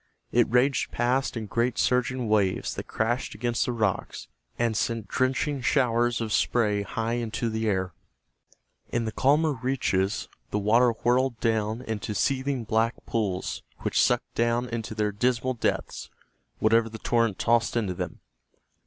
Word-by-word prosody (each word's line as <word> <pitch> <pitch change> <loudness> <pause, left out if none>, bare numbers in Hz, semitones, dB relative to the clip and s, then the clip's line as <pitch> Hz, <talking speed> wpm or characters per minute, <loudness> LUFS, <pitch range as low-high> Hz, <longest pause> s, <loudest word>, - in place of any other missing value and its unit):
It 120 -1 +3
raged 125 +3 +2
past 125 +1 0
in 110 - -4
great 115 +3 0
surging 125 -1 +1
waves 100 -3 +1
that - - -6
crashed 120 +2 -1
against 115 -1 -1
the - - 0
rocks 105 -5 -2 0.3
and 115 -2 +1
sent 115 0 -1
drenching 135 +2 0
showers 120 -2 +2
of 110 -2 -2
spray 105 -4 +2
high 115 +3 -2
into 115 +1 -2
the 110 0 -1
air. 95 -3 -1 1.0
In 115 -1 -1
the 110 - -2
calmer 150 +6 +3
reaches 105 -7 0 0.2
the - - -1
water 115 +4 +4
whirled 120 +1 +1
down 110 +1 0
into 105 -2 -4
seething 135 +1 0
black 110 +2 +1
pools 100 -5 -2 0.2
which - - +1
sucked - - +1
down 120 +1 +1
into 115 -1 -4
their 105 -1 0
dismal 125 +4 0
depths 120 - -2 0.5
whatever 115 +1 +3
the 110 - -8
torrent 115 -3 +1
tossed 120 0 +2
into 105 -6 0
them. - - -6
115 Hz, 150 wpm, -26 LUFS, 110-125 Hz, 1.0 s, water